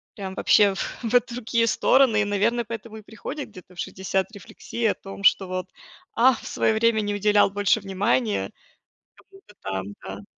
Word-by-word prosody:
прям, 190 -2 -6
вообще, 205 -2 +4
в - - -6 0.2
в 240 +2 +4
другие 230 -1 -1
стороны 240 -3 +4
и - - +2
наверное, 210 +4 +1
поэтому 225 0 -8
и 215 - -10
приходит 245 +7 -7
где-то 185 -2 -15
в 170 - -14
60 190 +1 -2
рефлексия 225 +2 -3
о - - -5
том, 195 0 -10
что 195 -1 +4
вот: 185 0 -3 0.5
"Ах, 245 0 +4
в - - -9
свое 220 - +1
время 220 0 +2
не 205 0 -2
уделял 205 0 +3
больше 205 +1 +1
внимания 205 +3 0 0.8
кому-то 390 - -18
там", 95 -1 -3 0.2
да. 100 +1 -8
210 Hz, 175 wpm, -24 LUFS, 195-230 Hz, 0.8 s, вообще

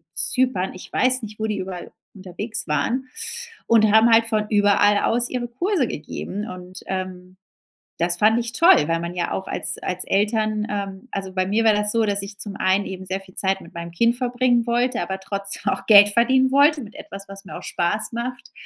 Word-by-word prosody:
Zypern. 250 -8 +1
Ich 185 - -11
weiß 255 0 +1
nicht 215 0 -8
wo 220 - -1
die 210 -1 -2
überall 185 -2 -7 0.2
unterwegs 200 +4 -5
waren 235 - -1 0.6
und 220 -2 +5
haben 220 +2 +6
halt 225 0 +5
von 215 -2 0
überall 205 0 +4
aus 240 +1 0
ihre 245 -1 -3
Kurse 300 - -1
gegeben. 200 +7 -6
Und, 185 +1 -9
ähm, 185 -1 -6 0.6
das 175 +1 +1
fand 220 +3 +4
ich 235 0 -5
toll, 335 - +5
weil 165 0 +1
man 170 +1 -5
ja 175 - -2
auch 190 - -4
als - - -2
als 180 0 -2
Eltern 215 +1 0
ähm, 200 +2 -5
also, 195 -1 -5
bei 185 -1 0
mir 215 +3 +1
war 220 - +6
das 210 0 0
so, 230 - +2
dass 200 -1 0
ich 200 +1 -9
zum 200 -2 -6
einen 190 +2 +1
eben 190 0 -7
sehr 190 +1 -3
viel 185 -1 -17
Zeit 190 0 0
mit 170 - -14
meinem 170 0 -7
Kind 235 +7 +2
verbringen 245 -1 +1
wollte, 245 +1 0
aber 190 0 -3
trotzdem 195 0 -2
auch - - -8
Geld 205 -1 +8
verdienen 260 +4 +3
wollte, 290 +1 +4
mit 215 - -12
etwas 195 0 -9
was 195 0 -11
mir - - -8
auch - - -10
Spaß 190 +7 -2
macht 245 +1 -5
205 Hz, 205 wpm, -22 LUFS, 190-235 Hz, 0.6 s, Geld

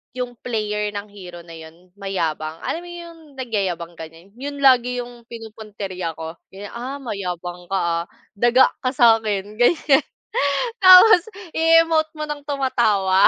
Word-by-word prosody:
'yung 245 -2 -5
player 210 -3 -2
ng 205 +1 -4
hero 180 -4 -11
na 165 - -14
yun 165 +2 -13
mayabang, 165 -5 -3
alam 330 - -2
mo 350 - -12
'yung 340 -1 -10 0.2
nagyayabang, 190 -9 -3
ganyan, 165 +4 -12
yun 285 0 -6
lagi 250 -1 +4
'yung 240 -1 -14
pinupuntirya 210 -7 -7
ko, 160 +1 -8
ganyan. 200 +1 -10
"Ah, 250 +4 -6
mayabang 180 -8 -6
ka 195 - -1
ha, 170 -2 0 0.4
daga 240 +3 +5
ka 255 - -1
sa 230 -2 +6
akin," 210 0 -4
ganyan. 290 +2 +4 0.8
Tapos, 370 +1 +9 0.3
i-emote 325 -1 +3
mo 305 - -5
ng 295 -1 -5
tumatawa. 220 -9 +2
215 Hz, 145 wpm, -21 LUFS, 180-265 Hz, 0.8 s, Tapos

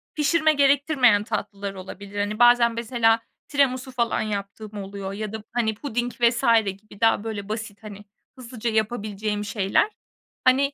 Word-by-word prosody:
pişirme 310 +1 +3
gerektirmeyen 275 -6 +4
tatlılar 200 -3 -4
olabilir. 195 +2 -8
Hani, 210 +2 -2
bazen, 240 -1 +6
mesela, 230 -1 +2 0.3
tiramisu 265 -3 +1
falan 235 -2 0
yaptığım 210 0 -5
oluyor 195 0 -6
ya 215 +1 -5
da, 220 -1 -6
hani, 220 -3 0
puding 245 0 -3
vs. 235 0 +3 0.2
gibi, 200 +2 -8
daha 225 -2 +3
böyle 210 -3 -5
basit, 215 -1 -5
hani, 205 -1 -10 0.3
hızlıca 240 -2 -4
yapabileceğim 215 -2 -2
şeyler. 205 - +1 0.5
Hani, 275 +2 +3
220 Hz, 140 wpm, -24 LUFS, 205-245 Hz, 0.5 s, bazen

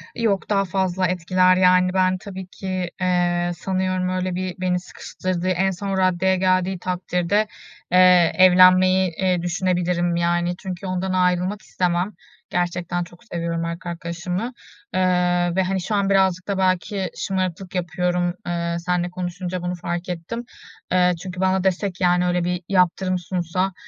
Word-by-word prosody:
Yok 220 -5 0
daha 195 -1 +2
fazla 185 0 0
etkiler, 185 +1 +3
yani, 180 0 +4
ben 185 0 +2
tabii 190 -1 -8
ki, 185 -1 -4
eee, 175 -1 +1
sanıyorum 185 0 -1
öyle 185 0 -2
bir 185 0 -3
beni 180 -1 +1
sıkıştırdığı 180 0 -5
en 190 +1 +1
son 195 +1 -3
raddeye 185 0 +2
geldiği 185 0 +1
takdirde, 180 +3 0 0.4
eee, 180 -2 +6
evlenmeyi, 185 0 +6
eee, 185 -2 +1
düşünebilirim, 175 -1 0
yani, 175 +1 0
çünkü 190 0 -6
ondan 185 0 -2
ayrılmak 180 +2 +1
istemem. 180 +2 -1 0.4
Gerçekten 175 0 -1
çok 175 +2 -15
seviyorum 170 -5 -3
erkek 170 +2 -5
arkadaşımı, 175 +7 -4 0.4
eee, 180 -1 +2
ve 190 - +3
hani, 190 0 -1
şu 210 +4 -2
an 200 -1 +1
birazcık 190 -2 +2
da 200 -1 -1
belki 190 +1 0
şımarıklık 185 -1 -3
yapıyorum, 175 0 0
eee, 170 -1 -1
seninle 180 0 -1
konuşunca 180 0 -4
bunu 180 0 -3
fark 175 +1 -4
ettim. 180 +8 -5 0.5
Eee, 180 0 +4
çünkü 185 -1 -7
bana 190 0 +2
dese 190 +1 0
ki 180 +1 -7
yani, 180 0 +3
öyle 180 0 +1
bir 180 0 -1
yaptırım 185 0 +2
sunsa 180 +1 -2
180 Hz, 150 wpm, -22 LUFS, 175-185 Hz, 0.5 s, eee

